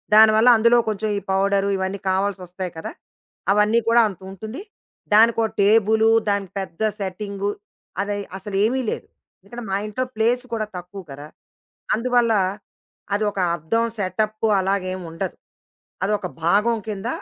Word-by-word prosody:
దానివల్ల 220 +2 +7
అందులో 235 +2 +5
కొంచెం 215 0 -2
ఈ - - 0
పౌడరు, 195 +1 +2
ఇవన్నీ 190 +1 -3
కావాల్సొస్తాయి 185 -2 -2
కదా! 160 - -5 0.6
అవన్నీ 210 +3 +3
కూడా 235 +1 +6
అంతుంటుంది. 195 - -8 0.5
దానికొ 225 +1 +5 0.2
టేబులు, 220 +2 +4 0.2
దానికి 200 -2 -1
పెద్ద 190 0 -9 0.2
సెట్టింగు 200 +1 -3 0.5
అదై 205 0 -2 0.2
అసలు 200 0 -7
ఏమీ 260 +4 +1
లేదు. - - -5 0.3
ఎందుకంటే 235 +5 -9
మా 195 - +1
ఇంట్లో 215 +5 -2
ప్లేస్ 235 +3 +1
కూడా 215 -2 -1
తక్కువ 180 +2 -8
కదా! 145 +2 -9 0.7
అందువల్ల, 240 0 +2 0.8
అది 205 +1 +1
ఒక 200 - -6 0.2
అద్దం 225 +9 0
సెటప్ 215 +3 -1 0.2
అలాగా 195 0 0
ఏం 185 - -5
ఉండదు. 180 +2 -4 0.7
అదొక 205 -1 0 0.2
భాగం 210 +6 +3
కింద 205 0 -4
205 Hz, 130 wpm, -22 LUFS, 190-220 Hz, 0.8 s, దానివల్ల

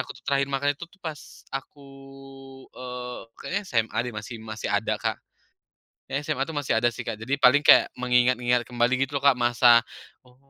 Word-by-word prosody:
aku - - -10
tuh - - -24
terakhir 140 0 +1
makan 140 +1 0
itu 170 - -9
tuh, 195 - -24
pas 155 -3 -6 0.3
aku, 140 +1 -7 0.9
eee, 125 -1 -7 0.2
kayaknya 200 +2 -3
SMA 115 -2 -1
deh 125 -1 -6
masih 105 +2 -7
masih 110 -1 -6
ada - - 0
Kak. - - -2 0.9
SMA 145 -1 -1
itu 160 - -8
masih 145 -6 -1
ada 120 +1 +2
sih - - -8
Kak. 115 - -3
Jadi, 130 +6 -3
paling 140 +3 +6
kayak, - - +7
mengingat-ngingat 125 -1 +2
kembali, 120 0 +1 0.2
gitu 145 - -4
loh 140 - -4
Kak, 140 - +7
masa, 120 0 +5 0.4
"Oh, 125 -1 -24
125 Hz, 185 wpm, -25 LUFS, 120-140 Hz, 0.9 s, kayak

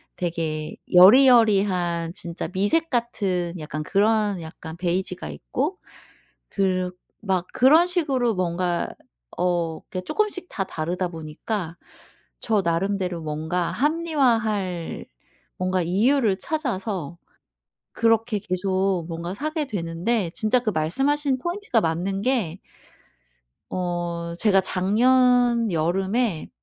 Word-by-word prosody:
되게 160 -3 -3 0.2
여리여리한 195 -6 +5
진짜 170 -1 -5
미색 205 - +1
같은 195 -8 -1
약간 155 0 -5
그런 205 +1 +1
약간 160 0 -9
베이지가 180 - -2
있고 70 -5 -3 0.7
그르 185 -2 0 0.3
막 185 -4 -1
그런 310 +8 +5
식으로 275 - +1
뭔가 175 -1 -1 0.5
어 170 -3 0
그게 185 -3 -6
쪼끔씩 395 - -1
다 195 - -2
다르다 175 +2 -3
보니까 165 +3 -5 0.6
저 215 -3 +1
나름대로 180 +1 -1
뭔가 160 +3 -2
합리화할 235 - 0 0.5
뭔가 185 0 0
이유를 210 +4 +2
찾아서 200 - -3 0.8
그렇게 225 -1 +2
계속 190 -2 -1
뭔가 170 +1 -5
사게 310 +5 -2
되는데 180 +1 -1
진짜 245 +1 +2
그 240 -3 -2
말씀 170 - 0
하신 290 -3 0
포인트가 345 - -1
맞는 175 +4 -1
게 205 -9 0 1.1
어. 175 -2 -3
제가 195 -2 +4
작년 240 +4 +3
여름에 190 +4 0
190 Hz, 230 characters per minute, -24 LUFS, 170-235 Hz, 1.1 s, 여리여리한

